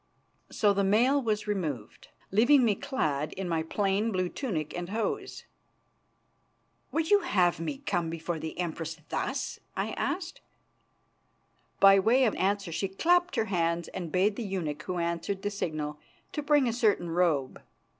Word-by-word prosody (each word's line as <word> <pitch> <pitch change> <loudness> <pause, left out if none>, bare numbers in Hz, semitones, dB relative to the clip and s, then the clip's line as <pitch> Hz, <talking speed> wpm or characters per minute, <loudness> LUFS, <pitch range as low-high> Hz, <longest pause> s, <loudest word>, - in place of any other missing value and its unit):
So 205 -2 +2
the 200 0 +1
mail 240 +8 +3
was 215 -4 -1
removed, 180 - -4 0.2
leaving 240 +6 +5
me 215 - +3
clad 155 - -2
in 190 -1 -4
my 165 -2 0
plain 200 +6 0
blue 185 -2 0
tunic 175 - -3
and 175 0 -4
hose. 220 +2 -3 1.5
"Would 325 +2 -1
you 410 - +7
have 185 - +2
me 165 - -3
come 170 -2 0
before 165 0 -4
the 160 0 -6
Empress 165 -2 -3
thus?" - - -3 0.2
I - - -1
asked. 365 -1 -3 1.4
By 195 0 +8
way 235 +7 +4
of 225 - +3
answer 195 -1 0
she 195 +4 -1
clapped 350 - +2
her 220 - +1
hands 170 -4 0
and 175 -4 -6
bade 200 +4 +2
the 240 - -3
eunuch 170 -7 -3
who 180 +2 -4
answered 170 +3 -2
the 205 - -1
signal 155 -6 -3 0.3
to 300 - -3
bring 290 -2 +3
a 230 - 0
certain 210 -8 +1
robe. 165 -6 +1
195 Hz, 155 wpm, -29 LUFS, 165-225 Hz, 1.5 s, By